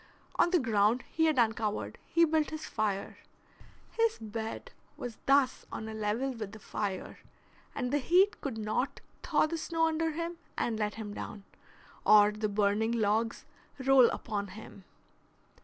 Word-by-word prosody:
On 345 - +4
the 360 - +4
ground 225 -3 +2
he 320 - +2
had 310 -3 +2
uncovered 225 -3 0
he 335 0 +4
built 315 -1 +1
his 310 0 -6
fire. 205 -3 -2 0.7
His 455 -1 +1
bed 225 - -6 0.3
was 235 -3 -6
thus 275 -1 +3
on 220 - -5
a 220 - -6
level 220 +5 -1
with 215 -4 -6
the - - -8
fire, 200 -2 -4 0.6
and 250 -1 -2
the 290 - +3
heat 365 +9 +3
could 265 -6 -4
not 220 +5 -2 0.2
thaw - - +2
the 325 +1 -3
snow 325 0 0
under 325 0 +1
him 335 +2 -4 0.2
and 225 -2 -1
let 210 -1 -1
him 215 -2 -6
down, 205 -1 -7 0.6
or 210 0 +7
the 215 0 -2
burning 210 +2 +1
logs 225 +1 0 0.3
roll 265 -2 +6
upon 205 -2 -3
him. 200 -3 -12
230 Hz, 155 wpm, -31 LUFS, 215-305 Hz, 0.7 s, or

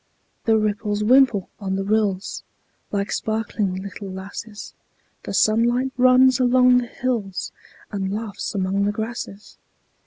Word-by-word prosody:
The 225 -1 +4
ripples 210 0 -1
wimple 240 -4 +4
on 190 -2 -2
the 195 - -1
rills, 200 -2 0 0.5
Like 200 0 -2
sparkling 215 -3 -1
little 195 +1 -7
lasses; 200 +3 -8 0.5
The - - -5
sunlight 240 +4 +2
runs 255 0 +5
along 250 0 +5
the 245 - -4
hills, 230 -7 -3 0.4
And 195 -2 -2
laughs 210 -1 -4
among 195 +1 0
the 205 - +1
grasses. 220 -2 -6
215 Hz, 125 wpm, -22 LUFS, 200-240 Hz, 0.5 s, runs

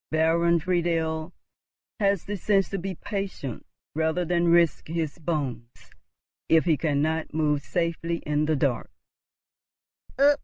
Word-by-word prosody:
Baron 165 +2 +3
Friedel 165 -1 0 0.7
has 200 -3 +1
the 205 - -3
sense 195 0 +1
to 195 - -3
be 190 +1 -4
patient 190 - -5 0.3
rather 160 +3 0
than 175 0 +1
risk 170 -2 +3
his 160 -1 -3
bones 140 -8 -3 0.8
if 160 0 +5
he 165 -3 +4
cannot 155 +1 -1
move 150 -2 +1
safely 170 +1 -1
in 150 0 +1
the 155 0 +1
dark." 135 -4 0
165 Hz, 120 wpm, -26 LUFS, 155-175 Hz, 0.8 s, if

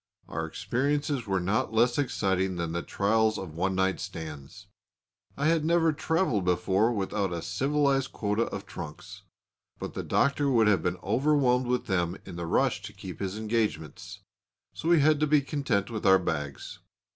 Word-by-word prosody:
Our - - -3
experiences 140 -1 -1
were 95 -1 +1
not 100 +5 0
less 120 +4 +3
exciting 95 -8 0
than 85 -1 -3
the 85 +1 -2
trials 110 +3 +1
of 95 -5 -7
one 95 +3 -1
night 95 0 +1
stands. 80 -7 -8 0.7
I 145 - -1
had 160 0 +3
never 165 0 +3
travelled 160 - 0
before 95 +5 +2
without 100 -3 -1
a 85 -1 -4
civilised 135 +7 +1
quota 105 +2 0
of - - -6
trunks; 75 0 -9 0.6
but - - -6
the - - -3
Doctor 140 0 +1
would 115 -4 +4
have 100 -5 +3
been 90 +1 -1
overwhelmed 125 +2 +2
with 125 0 0
them 90 -2 -1
in - - -8
the 85 -1 -4
rush - - +1
to - - -9
keep - - -9
his 95 +1 -3
engagements. 110 - -3 0.5
So 165 - -3
we 170 -3 +5
had 155 0 +4
to 155 - +2
be 150 0 +5
content 130 -8 -1
with 110 -2 -4
our 95 0 +7
bags. 75 -6 -4
110 Hz, 170 wpm, -28 LUFS, 95-140 Hz, 0.7 s, our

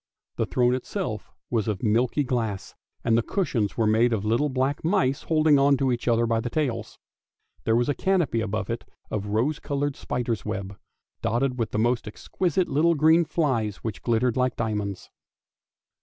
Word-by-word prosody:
The - - 0
throne 125 -1 +2
itself 130 - -4 0.2
was 115 -3 0
of 105 -1 -2
milky 120 +6 +2
glass, 115 -7 -2 0.3
and 115 -1 +3
the 115 - +4
cushions 115 - -1
were 115 - +2
made 115 +3 +3
of 105 -2 -1
little 120 +7 +2
black 130 +2 -1
mice 155 -6 +1
holding 155 -3 +3
on 140 0 +4
to 130 0 +1
each 120 0 -3
other 120 0 +3
by 115 -1 +1
the 120 +2 -3
tails. 145 -3 -2 0.7
There 110 - +3
was 120 +1 +2
a 145 - +2
canopy 175 -10 +1
above 110 -1 -2
it 115 - -4 0.3
of 105 -1 -2
rose 120 +9 0
coloured 140 0 -2
spider's 120 -4 -3
web, 100 0 -4 0.5
dotted 125 +3 0
with 115 -2 0
the - - -3
most 120 +1 +1
exquisite 175 - -1
little 160 +4 +3
green 160 +3 +5
flies 120 - 0
which 110 -3 -4
glittered 120 0 +1
like 130 -1 +1
diamonds. 105 -3 -3
120 Hz, 175 wpm, -25 LUFS, 110-140 Hz, 0.7 s, green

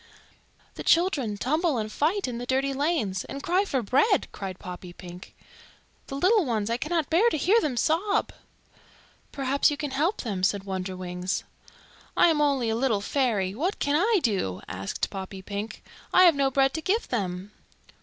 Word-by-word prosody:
"The - - -7
children 295 - +2
tumble 310 - +1
and 215 -1 -3
fight 335 - 0
in 240 -2 -4
the 245 - -6
dirty 270 +1 +1
lanes, 270 - 0
and 275 0 -7
cry 370 +4 +2
for 265 -10 -1
bread," 285 - +2
cried 190 -2 -6
Poppypink. 180 -1 -10 0.7
"The 275 - -6
little 385 +8 +3
ones, 225 -5 -1
I 235 - +1
cannot 310 +3 -1
bear 390 +9 +5
to 315 - -1
hear 405 +10 +3
them 265 -5 -2
sob." 375 - +1 1.0
"Perhaps 275 0 +2
you 290 - -3
can 295 -2 -4
help 315 +10 0
them," 200 -6 -3
said 195 +1 +1
Wonderwings. 185 -1 -3 0.7
"I - - +6
am 305 -2 +2
only 275 -5 +2
a - - 0
little 230 -4 +1
fairy. 205 -6 0
What 335 - -1
can 285 +1 0
I 410 +6 +3
do?" 185 - -1
asked 95 +1 -4
Poppypink. 195 +2 -6 0.3
"I 365 - +6
have 345 -2 +7
no 280 -1 +1
bread 270 0 +2
to 320 - -3
give 405 +8 0
them." 190 -3 -3
265 Hz, 170 wpm, -26 LUFS, 200-320 Hz, 1.0 s, have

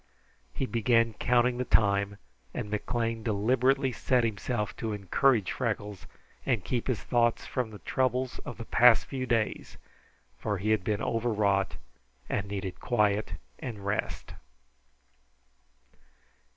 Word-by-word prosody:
He 135 - -2
began 115 -1 +2
counting 125 +2 +2
the - - +1
time, 100 -3 +2 0.4
and 105 - -4
McLean 115 +1 -1
deliberately 125 +5 +2
set 125 +1 +1
himself 105 -1 -2
to 110 -2 -3
encourage 105 +2 +2
Freckles 105 -5 -3 0.4
and 120 -8 0
keep 120 +5 -2
his 130 -5 -1
thoughts 120 -2 +1
from 125 -3 -2
the 105 - -10
trouble 130 +3 0 0.2
of - - -7
the 115 - -7
past 120 0 +6
few 130 -2 -4
days, 115 -2 -1 0.6
for 105 -2 -1
he 105 +4 0
had 110 -4 +2
been 105 +1 -1
overwrought 105 -4 +1 0.5
and 100 -1 -2
needed 95 -2 -5
quiet 105 -6 +1 0.3
and 110 -6 -6
rest. 100 +1 -3
115 Hz, 125 wpm, -29 LUFS, 105-125 Hz, 0.6 s, past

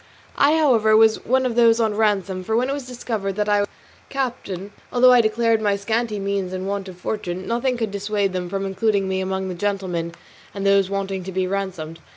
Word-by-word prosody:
I, 295 +3 +5
however, 225 -8 +4
was 220 0 +4
one 260 +2 +2
of 250 - 0
those 230 -1 +4
on 220 -2 +1
ransom, 200 -3 0
for 220 +4 -1
when 250 +3 +1
it - - 0
was 280 -3 -5
discovered 225 -5 -3
that 210 0 -1
I 205 0 +3
was 205 - 0
a - - -28
captain, 230 -8 -4 0.2
although 250 0 +6
I 245 -1 +7
declared 225 0 +1
my 205 -2 +2
scanty 220 +2 -1
means 195 -2 -2
and 185 +1 -4
want 200 -1 -3
of 180 - -11
fortune, 185 -1 -4
nothing 240 +2 0
could 225 -3 -2
dissuade 200 -1 -1
them 180 -1 -3
from 195 +1 -2
including 195 0 0
me 190 0 -1
among 190 0 -2
the 185 - -4
gentlemen 180 -3 -2 0.4
and 200 0 -4
those 200 -1 +4
waiting 195 -1 -3
to 190 - -5
be 185 0 0
ransomed. 185 -4 -4
200 Hz, 215 wpm, -22 LUFS, 190-230 Hz, 0.4 s, I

